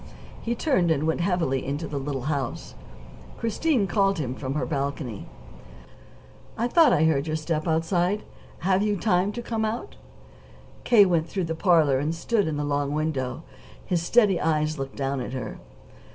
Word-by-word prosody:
He 235 +1 -2
turned 230 - +1
and 155 -2 +1
went 160 +2 0
heavily 170 -8 0
into 145 +4 -3
the 145 - -3
little 135 -2 -4
house. 140 -3 -3 0.6
Christine 230 +1 +1
called 195 +1 +2
to 155 - -2
him 125 -1 -3
from 130 0 -4
her 150 - 0
little - - -4
balcony: 135 -6 -4 1.3
"I 235 - +1
thought 320 +4 +5
I 155 - +3
heard 155 -2 +2
your 155 - -1
step 155 +1 -2
outside. 175 +5 +1 0.4
Have 190 +2 +2
you 210 -1 +1
time 185 0 +1
to 240 - -5
come 225 -1 -2
out?" 220 +2 -4 0.9
K. 220 -4 +7
went 170 -3 +1
through 190 +1 -2
the 165 -1 -2
parlor 160 -6 +3
and 155 +4 -1
stood 205 +3 0
in 155 -2 -2
the 145 - -1
long 145 0 -1
window. 150 -2 -2 0.4
His 175 -2 0
steady 200 0 +3
eyes 155 -1 0
looked 135 0 -5
down 135 -1 -2
at 125 - -5
her. 130 -3 -5
160 Hz, 180 wpm, -25 LUFS, 145-195 Hz, 1.3 s, K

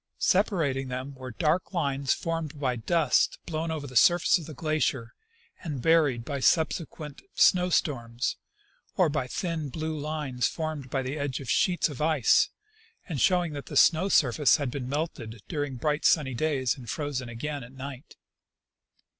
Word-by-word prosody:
Separating 165 - +1
them 130 +2 -5
were 130 -1 -8
dark 155 - 0
lines 140 -4 0
formed 165 -3 -2
by 130 -3 0
dust 150 +4 +2
blown 165 0 -3
over 155 -3 -3
the 130 -2 -10
surface 175 - +5
of 160 - -9
the 155 - -9
glacier 150 -5 -1 0.5
and 150 -6 -4
buried 145 -6 +3
by 140 -1 -3
subsequent 155 0 0
snow 180 0 +4
storms, 120 -8 -1 0.6
or 180 -4 +4
by 145 -4 -2
thin 165 0 -3
blue 160 +3 -4
lines 150 -5 -2
formed 155 -5 -4
by 135 0 -1
the 135 +4 -4
edges 140 -1 -3
of 130 -3 -3
sheets 180 +4 +2
of 145 -4 -7
ice 155 -6 +3 0.6
and 155 - -3
showing 180 -4 +2
that 145 -1 -7
the - - -3
snow 180 +4 +5
surface 140 -3 +4
had 140 -5 -3
been 130 -2 -5
melted 135 -7 -4
during 145 -4 -3
bright 150 +5 -1
sunny 140 -5 +3
days 135 -2 0
and 125 -5 -11
frozen 135 -2 -3
again 140 +4 -5
at 120 - -12
night. 135 +1 -9
145 Hz, 165 wpm, -27 LUFS, 130-160 Hz, 0.6 s, surface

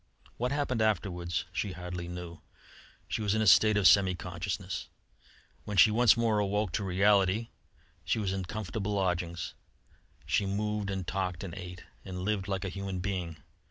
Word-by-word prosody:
What 125 +2 -1
happened 140 -5 0
afterwards 90 -6 0
she 100 - -2
hardly 90 0 -6
knew; 85 -1 -7 0.7
she - - -2
was 105 0 +1
in 110 - +1
a - - 0
state 110 +2 +6
of 100 -2 +6
semi 95 -1 +5
consciousness. 90 +2 -4 0.8
When 105 -1 -4
she 105 +4 +8
once 115 0 +5
more 110 -3 +2
woke 105 -1 0
to 100 - -1
reality, 100 +3 +3 0.5
she - - 0
was 100 -3 -1
in 95 -1 -3
comfortable 105 +1 -3
lodgings; 90 -3 -1 0.7
she 95 +6 +1
moved 105 +1 -1
and 95 -2 -3
talked 90 -2 -2
and 90 -4 -6
ate 90 -1 -8 0.2
and 90 -1 -6
lived 100 -1 -1
like 95 0 -2
a - - -2
human 95 0 -4
being. 90 -5 -4
95 Hz, 165 wpm, -30 LUFS, 90-105 Hz, 0.8 s, she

